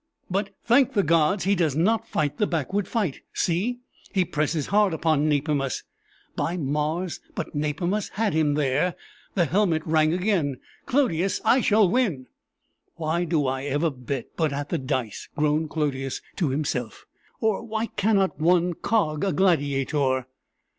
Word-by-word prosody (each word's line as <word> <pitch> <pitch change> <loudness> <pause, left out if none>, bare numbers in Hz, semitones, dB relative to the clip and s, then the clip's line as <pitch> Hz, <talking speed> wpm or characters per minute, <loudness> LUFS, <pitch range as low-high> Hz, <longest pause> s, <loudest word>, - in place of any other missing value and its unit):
"But, 195 +2 0
thank 250 +2 +4
the 200 - +3
gods! 165 +4 +3
he 195 - +3
does 165 -7 +1
not 220 +8 +2
fight 150 +1 -1
the 210 - +2
backward 180 +4 -1
fight. 205 - -1
See! 215 +9 0 0.3
he 190 -3 +2
presses 150 0 -1
hard 205 -3 +3
upon 155 -2 +2
Nepimus. 145 -2 0 0.5
By 175 +2 -1
Mars! 155 +4 -1 0.2
but - - -4
Nepimus 160 +7 -1
had 215 -3 0
him 150 -2 +2
there! 150 +4 +1 0.4
the 175 -4 +3
helmet 170 -2 +1
rang 155 -1 +3
again! 175 -7 0 0.3
Clodius, 195 - +1
I 255 - +5
shall 210 -2 +4
win!" 180 - 0 0.7
"Why 165 +2 -1
do 160 -4 +1
I 130 +1 -2
ever 145 +3 0
bet 130 -1 -5
but 160 -3 +1
at 145 +1 -4
the 170 - -1
dice?" 130 -5 -3
groaned 150 +1 +1
Clodius 135 -4 -2 0.2
to 165 -6 +1
himself; 130 -5 -3 0.3
"or 220 -3 +1
why 220 0 -2
cannot 200 -6 +1
one 175 +2 +3
cog 160 -6 0
a 195 - +1
gladiator?" 140 -6 +1
160 Hz, 150 wpm, -25 LUFS, 145-195 Hz, 0.7 s, I